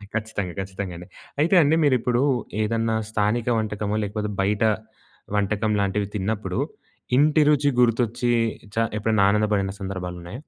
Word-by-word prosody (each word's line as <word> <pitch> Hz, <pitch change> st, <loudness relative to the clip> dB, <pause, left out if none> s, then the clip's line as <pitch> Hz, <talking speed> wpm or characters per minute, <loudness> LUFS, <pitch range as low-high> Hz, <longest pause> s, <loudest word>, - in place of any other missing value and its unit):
ఖచ్చితంగా. 100 Hz, -5 st, -3 dB
ఖచ్చితంగా 95 Hz, -1 st, -5 dB
అండి. 90 Hz, -, -10 dB, 0.3 s
అయితే 175 Hz, +5 st, +3 dB
అండి 150 Hz, +3 st, +3 dB
మీరు 140 Hz, -3 st, +4 dB
ఇప్పుడు 120 Hz, +1 st, +1 dB, 0.4 s
ఏదన్నా 115 Hz, +1 st, 0 dB
స్థానిక 110 Hz, +3 st, 0 dB
వంటకమో 105 Hz, 0 st, -2 dB
లేకపోతే 105 Hz, +1 st, -3 dB
బయట 105 Hz, +3 st, +1 dB, 0.7 s
వంటకం 105 Hz, +1 st, 0 dB
లాంటివి 100 Hz, 0 st, 0 dB
తిన్నప్పుడు 100 Hz, -2 st, -2 dB, 0.6 s
ఇంటి 150 Hz, +2 st, +4 dB
రుచి 145 Hz, -1 st, +4 dB
గుర్తొచ్చి 120 Hz, 0 st, +2 dB, 0.4 s
చ 115 Hz, 0 st, +2 dB
ఎప్పుడైనా 110 Hz, -2 st, +2 dB
ఆనందపడిన 105 Hz, -2 st, +1 dB
సందర్భాలున్నాయా? 90 Hz, +2 st, -6 dB
105 Hz, 125 wpm, -24 LUFS, 100-115 Hz, 0.7 s, మీరు